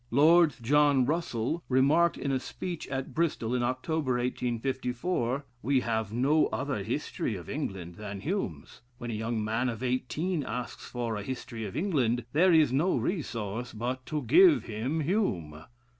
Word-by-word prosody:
Lord 160 +5 +5
John 145 0 +4
Russell 155 0 -1
remarked 145 +6 +4
in 140 - -2
a 130 - +1
speech 170 +6 -6
at 135 -1 -4
Bristol, 150 -8 0
in 125 - +1
October, 130 +3 -1
1854: 125 +3 -1 0.2
"We 135 0 +2
have 110 -3 -1
no 135 +7 +3
other - - -2
'History - - -2
of - - -8
England' 90 -3 -5
than 100 -2 -6
Hume's.... 140 - -4 0.2
When 120 -1 -5
a - - -3
young 110 +1 -2
man 115 +4 0
of 115 +1 -5
eighteen 145 +7 -1
asks 120 -1 -5
for 120 -3 -3
a - - -4
'History 120 -1 -5
of 100 - -6
England,' 130 - +1
there 180 +5 +5
is 155 -6 +5
no 165 +8 +2
resource 120 - -3
but 125 +4 -3
to 150 -1 -2
give 350 -3 +6
him 120 +9 -2
Hume." 90 - -1
130 Hz, 160 wpm, -29 LUFS, 115-155 Hz, 0.2 s, give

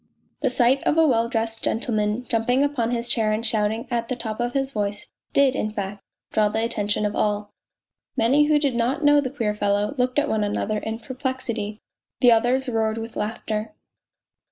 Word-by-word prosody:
The 275 - +2
sight 250 +2 +3
of 310 - +1
a 325 - +6
well 235 -5 +2
dressed 225 -1 -2
gentleman 215 0 -1
jumping 245 +4 +2
upon 275 -6 0
his 240 0 -1
chair 225 -3 +2
and 215 +2 -1
shouting 220 +2 0
at 235 -1 -1
the 255 - -2
top 220 -2 -5
of 240 0 -1
his 270 -1 0
voice 205 -3 -3 0.2
did, 275 -2 +3
in 215 - -1
fact, 200 -1 -5 0.3
draw 215 -1 +3
the 220 +2 0
attention 210 -2 -1
of 210 - -1
all. 205 0 0 0.7
Many 265 +6 +4
who 300 0 +4
did 285 -3 +1
not 250 +6 0
know 290 0 +6
the 260 - -3
queer 230 -6 -1
fellow 205 +2 0
looked 250 +2 +1
at 290 0 +3
one 220 -6 0
another 210 +1 -1
in 220 +1 -4
perplexity, 235 -3 -4 0.4
the 245 -1 +6
others 245 +4 +3
roared 220 -2 0
with 225 0 -6
laughter. 215 +3 -3
230 Hz, 190 wpm, -23 LUFS, 215-255 Hz, 0.7 s, a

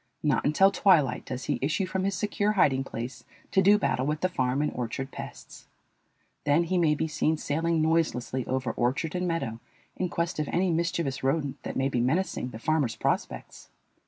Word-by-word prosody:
Not 150 -3 +2
until 190 +7 +5
twilight 170 -9 +3
does 130 0 -5
he - - -1
issue 155 +8 0
from 185 +1 -2
his 195 -1 0
secure 205 +2 0
hiding 135 -9 +3
place 120 -1 -6 0.3
to 190 - +4
do 200 +2 +6
battle 130 -10 0
with 150 +1 -1
the 185 - +2
farm 130 -2 0
and 150 - 0
orchard 130 +3 -4
pests. - - -10 0.8
Then 150 +4 +3
he 180 +2 0
may 155 -3 +3
be 160 - -1
seen 155 0 0
sailing 160 +2 0
noiselessly 155 -6 0
over 130 -2 -1
orchard 130 +8 -1
and 180 0 -1
meadow 140 -10 -2 0.4
in 180 - -2
quest 170 0 -2
of 150 - -1
any 180 +1 +1
mischievous 170 -5 -1
rodent 140 +1 -1
that - - -5
may 135 0 +2
be 125 -3 0
menacing 135 0 0
the 110 - -8
farmer's 145 -1 0
prospects. - - -3
155 Hz, 190 wpm, -27 LUFS, 130-175 Hz, 0.8 s, do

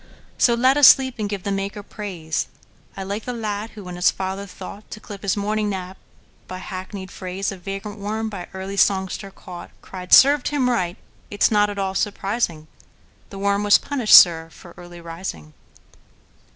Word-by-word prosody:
So 235 - +4
let 260 +4 +3
us 290 - +9
sleep, 260 -3 +5
and 210 -1 -2
give 200 -3 -4
the 200 - -2
Maker 195 +1 -3
praise.I 190 -1 -7
like 200 +3 -5
the 250 - -3
lad 215 -2 -4
who, 210 - -9
when 180 -1 -8
his 180 - +4
father 190 +1 -4
thoughtTo 200 +3 -10
clip 205 -2 -10
his 200 -1 -1
morning 210 +1 -1
nap 190 -1 -5 0.5
by 185 - -6
hackneyed 190 +1 -7
phraseOf 190 +1 -4
vagrant 195 +2 -6
worm 215 +2 -3
by 200 -5 -7
early 190 +1 -5
songster 195 0 +1
caught, 180 -2 -11
Cried, 180 -1 -9
"Served 280 0 +7
him 270 -4 +1
right!—it 185 0 -4
's - - +5
not 210 -1 +3
at 205 - -6
all 190 -1 -1
surprising; 195 -5 -2 0.6
The 195 - -9
worm 200 +1 0
was 205 0 +6
punished, 260 -7 +4
sir, 165 -2 +7
for 175 0 -14
early 175 -1 -12
rising!" 165 - -7
195 Hz, 170 wpm, -22 LUFS, 185-210 Hz, 0.6 s, us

